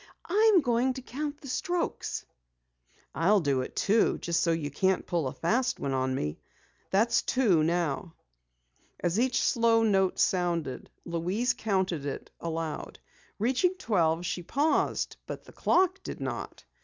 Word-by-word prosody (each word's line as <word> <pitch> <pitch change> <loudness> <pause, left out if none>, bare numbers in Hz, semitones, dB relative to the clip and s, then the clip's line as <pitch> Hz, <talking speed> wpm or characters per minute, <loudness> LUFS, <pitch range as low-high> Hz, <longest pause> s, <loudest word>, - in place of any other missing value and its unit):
"I'm 420 0 +5
going 245 0 +1
to 260 - -7
count 290 +3 -5
the 275 - -10
strokes." 355 +6 -2 0.9
"I'll 200 +6 +3
do 140 -6 +1
it 130 - -7
too, 215 +2 +3
just 170 0 0
so 170 - +2
you 155 -3 -2
can't 190 +6 +1
pull 170 -6 -1
a - - -3
fast 250 +9 0
one 135 - -2
on 130 0 0
me. 75 - -3 0.5
That's 230 +4 +3
two 215 -11 +2
now." 165 0 -1 0.8
As 175 +4 0
each 255 0 +2
slow 230 -1 +3
note 190 -4 +2
sounded, 170 -8 0 0.2
Louise 180 +9 0
counted 190 - -1
it 140 - -6
aloud. 165 -2 -4 0.4
Reaching 260 - +1
twelve, 175 - +1
she 175 - -2
paused, 285 - 0
but - - -6
the - - -16
clock 375 +1 +2
did - - -7
not. - - -5
190 Hz, 145 wpm, -29 LUFS, 165-250 Hz, 0.9 s, I'm